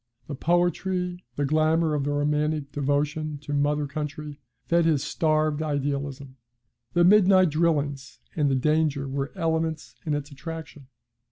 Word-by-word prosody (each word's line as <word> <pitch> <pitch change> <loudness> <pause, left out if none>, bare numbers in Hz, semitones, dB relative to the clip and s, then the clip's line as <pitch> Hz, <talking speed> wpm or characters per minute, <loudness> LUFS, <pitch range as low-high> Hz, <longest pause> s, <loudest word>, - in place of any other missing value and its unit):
The 150 - -6
poetry, 175 +3 0
the 145 - 0
glamour 155 +2 +2
of 145 -2 -1
the 145 - 0
romantic 150 0 0
devotion 145 +2 -1
to 145 - -4
Mother 145 +1 +1
Country 150 0 -6 0.3
fed 170 0 +3
his 150 -4 +2
starved 155 -1 +1
idealism; 140 -2 -3 0.6
the 175 - +4
midnight 185 -2 +6
drillings 145 -4 0 0.2
and 150 -3 +2
the 135 - +2
danger 150 0 +1
were 135 +1 -3
elements 160 -3 -1
in 150 -3 -1
its 145 0 -5
attraction. 150 -1 -8
150 Hz, 140 wpm, -26 LUFS, 145-160 Hz, 0.6 s, midnight